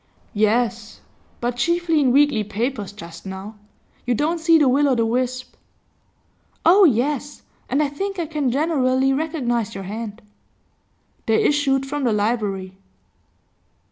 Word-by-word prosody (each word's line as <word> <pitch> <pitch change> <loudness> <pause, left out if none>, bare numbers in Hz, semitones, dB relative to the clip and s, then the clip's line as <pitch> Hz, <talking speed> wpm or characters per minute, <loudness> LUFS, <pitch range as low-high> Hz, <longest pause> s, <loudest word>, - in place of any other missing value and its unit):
'Yes; 220 +1 0 0.4
but 240 0 -2
chiefly 340 +4 +1
in 265 -4 +3
weekly 280 -5 +3
papers 215 0 -3
just 170 -5 -11
now. 190 +2 -7 0.5
You 245 0 0
don't 320 +7 0
see 325 0 +5
the 295 -3 +3
Will 280 +3 +3
o' 260 - +2
the 230 -1 +1
Wisp?' 255 +2 -2 1.1
'Oh 380 +4 +7
yes. 285 +1 0 0.3
And 280 +4 +2
I - - +1
think 390 +8 -4
I 340 - -1
can 300 -4 -1
generally 270 -2 +1
recognise 250 -8 -2
your 195 - -5
hand.' 215 +2 -7 1.0
They 220 -1 +3
issued 275 -2 +2
from 290 +1 -3
the 240 -4 +2
library. 205 -3 -2
255 Hz, 140 wpm, -21 LUFS, 220-290 Hz, 1.1 s, Oh